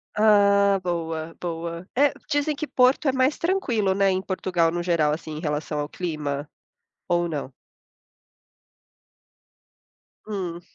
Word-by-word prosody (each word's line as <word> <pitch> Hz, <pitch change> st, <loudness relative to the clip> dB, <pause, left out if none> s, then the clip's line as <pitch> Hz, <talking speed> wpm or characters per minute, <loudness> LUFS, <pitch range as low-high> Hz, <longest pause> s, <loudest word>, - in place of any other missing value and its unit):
Ah, 200 Hz, -2 st, +5 dB
boa, 165 Hz, -2 st, -3 dB
boa. 170 Hz, +1 st, -5 dB
É, 285 Hz, +2 st, +4 dB, 0.2 s
dizem 290 Hz, +1 st, +1 dB
que 295 Hz, +1 st, -5 dB
Porto 255 Hz, +3 st, +3 dB
é 265 Hz, -, +3 dB
mais 260 Hz, +2 st, +2 dB
tranquilo, 245 Hz, -, +1 dB
né? 195 Hz, 0 st, +3 dB
Em 185 Hz, 0 st, 0 dB
Portugal, 180 Hz, -3 st, 0 dB
no 175 Hz, +1 st, -2 dB
geral, 160 Hz, -4 st, +2 dB
assim, 160 Hz, 0 st, -6 dB
em -, -, -4 dB
relação 150 Hz, -1 st, -2 dB
ao 145 Hz, -, -2 dB
clima. 150 Hz, -4 st, -4 dB, 0.6 s
Ou 175 Hz, 0 st, +1 dB
não? 145 Hz, -4 st, -4 dB, 2.7 s
Hum. 180 Hz, -5 st, -4 dB
180 Hz, 130 wpm, -24 LUFS, 165-210 Hz, 2.7 s, Ah